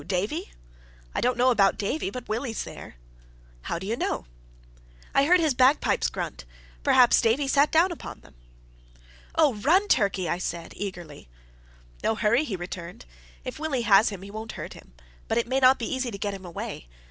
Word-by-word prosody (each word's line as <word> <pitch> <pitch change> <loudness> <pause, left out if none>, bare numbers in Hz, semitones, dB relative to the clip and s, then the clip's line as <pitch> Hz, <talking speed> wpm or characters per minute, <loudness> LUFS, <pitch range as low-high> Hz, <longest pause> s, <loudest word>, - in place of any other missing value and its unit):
Davie?" 185 - -2 0.6
"I - - -1
don't 250 0 +1
know 255 +1 +4
about 200 -4 +3
Davie; 205 +3 -2
but 250 +3 -8
Willie's 225 +1 -3
there." - - -10 0.7
"How 170 - -3
do 185 - -7
you 220 +3 -1
know?" 235 - -2 0.9
"I 275 - +4
heard 360 +4 +5
his 315 -4 +2
bagpipes 260 +4 +3
grunt. - - -5 0.4
Perhaps 250 -2 +5
Davie 255 +5 +2
sat 285 +2 +3
down 335 +3 +4
upon 340 - -8
them." - - -19 1.0
"Oh, 305 -5 +4
run, 325 - +2
Turkey!" 200 - +2
I 175 - -1
said, 170 -2 -5
eagerly. 175 - -7 0.8
"No 225 - +1
hurry," 230 +5 +2
he 215 - -3
returned. 175 - -8 0.4
"If - - -6
Willie 295 -6 -1
has 205 0 +5
him, 195 -3 -8
he 200 - -9
won't 220 +1 -6
hurt - - -7
him, - - -16 0.3
but 225 - 0
it 235 - +2
mayn't 260 +1 +5
be 235 - -3
easy 260 -1 -1
to 205 - -6
get 205 0 -3
him 190 -1 -9
away. 165 - -6
225 Hz, 180 wpm, -26 LUFS, 195-265 Hz, 1.0 s, heard